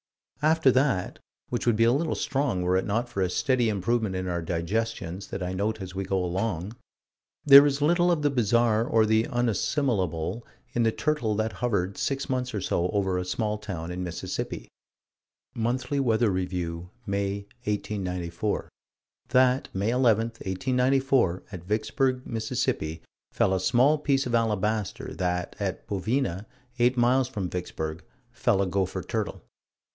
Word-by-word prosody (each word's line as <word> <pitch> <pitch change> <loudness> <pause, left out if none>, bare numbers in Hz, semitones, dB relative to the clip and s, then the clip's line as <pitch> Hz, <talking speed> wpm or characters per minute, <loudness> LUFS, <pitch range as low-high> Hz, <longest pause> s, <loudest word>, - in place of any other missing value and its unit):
After 155 -2 +4
that, 130 -8 +1 0.3
which 120 0 -2
would 120 - +4
be 115 - +3
a 115 - +5
little 155 +5 0
strong 135 -10 -1
were 90 +1 +2
it 95 +2 +1
not 115 +4 0
for 110 -5 -3
a 90 - +1
steady 125 +4 +1
improvement 105 0 0
in 95 0 -3
our 85 -1 -1
digestions 95 +2 -3
that 95 - -5
I 90 +1 -3
note 105 +4 -1
as 95 -2 -7
we 95 +1 -3
go 95 -1 0
along, 95 +2 -2 0.7
there 140 -1 +11
is 140 0 0
little 175 +3 +4
of 160 -4 0
the 145 - +3
bizarre 115 -2 +3
or 115 -2 +3
the 110 +1 +2
unassimilable 115 - 0 0.3
in 120 - +1
the 115 -1 +3
turtle 120 -6 0
that 110 +1 0
hovered 100 -6 -1
six 135 0 -1
months 125 -3 -2
or 100 - -2
so 90 -1 0
over 95 -2 0
a 90 - -3
small 105 +2 -2
town 90 -5 -5
in 90 +1 -4
Mississippi: 85 -7 -4 0.9
Monthly 125 +4 -1
Weather 115 -4 +2
Review, 90 -2 -3 0.2
May, 100 -1 -1 0.2
1894: 95 -2 -2 0.6
That, 130 +1 +3
May 100 +4 +1
11, 120 -3 +3 0.2
1894, 125 0 +1
at 90 -4 -7
Vicksburg, 125 +5 0
Miss., 115 -1 -2 0.6
fell 95 - +2
a 95 - +1
small 130 +10 +3
piece 140 -2 +1
of 125 - -3
alabaster; 110 -2 0
that, 90 -1 -2
at 95 -2 -3
Bovina, 105 0 -1 0.3
eight 125 +2 +3
miles 125 +2 +3
from 105 -8 -3
Vicksburg, 80 -2 -4 0.3
fell 120 -4 +1
a - - 0
gopher 95 0 -1
turtle. - - -3
110 Hz, 155 wpm, -27 LUFS, 95-125 Hz, 0.9 s, there